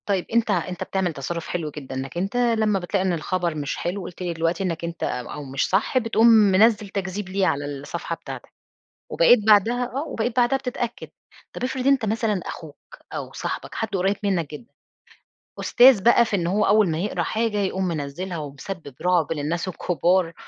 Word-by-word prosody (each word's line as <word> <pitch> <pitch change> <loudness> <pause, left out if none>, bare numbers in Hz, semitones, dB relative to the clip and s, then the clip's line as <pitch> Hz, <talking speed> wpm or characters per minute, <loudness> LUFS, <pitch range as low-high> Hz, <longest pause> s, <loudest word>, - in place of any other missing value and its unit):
طيب 195 -3 0
أنتَ 230 -2 +2
أنتَ 180 -1 -2
بتعمل 190 -3 -1
تصَرُّف 160 +4 -5
حلو 165 -4 -3
جدًا، 135 -3 -8
إنَّك 135 +5 -5
أنتَ 195 +5 -2
لما 220 -4 +2
بتلاقِي 185 +2 -1
إن 185 - +1
الخبر 170 0 -1
مش 145 -2 -3
حلو، 185 +3 -3
قلت 175 +1 -9
لي 175 -2 -2
دلوقتي 165 +3 -1
إنك 170 -2 -3
أنتَ 170 0 -5
أو 125 +4 -4
مش 135 0 -2
صح 200 +7 +1
بتقوم 230 -1 +3
منزِّل 215 -1 +5
تكذِيب 190 0 -4
ليه 190 0 +1
على 145 -2 0
الصَّفحة 145 0 -5
بتاعتك، - - -10 0.6
وبقيت - - +6
بعدها 220 +4 +4
آه، 275 +3 -1
وبقيت 230 +1 -2
بعدها 245 +2 +3
بتتأكَّد. 245 -3 -4 0.4
طب - - -5
افرِض 260 0 -2
أنتَ 275 -4 +4
مثلًا 215 -2 0
أخوك 155 -3 -10
أو - - -5
صاحبك - - -5
حد 225 - -2
قريب 195 +2 +1
منك 185 -7 0
جدًا، 190 +11 -10 0.9
أستاذ 245 -5 +6
بقى 235 0 +6
في 220 - -1
إن 170 -3 -1
هو 205 +4 +2
أول 210 -2 +4
ما 155 - -1
يقرَأ 200 +4 -1
حاجة 225 -1 -1
يقوم 190 -1 -1
منزِّلها، 170 +3 -4
ومسبِّب 150 +1 -7
رُعب 175 -3 +2
للناس 160 +4 -2
الكبار 175 0 +1
190 Hz, 180 wpm, -23 LUFS, 165-220 Hz, 0.9 s, وبقيت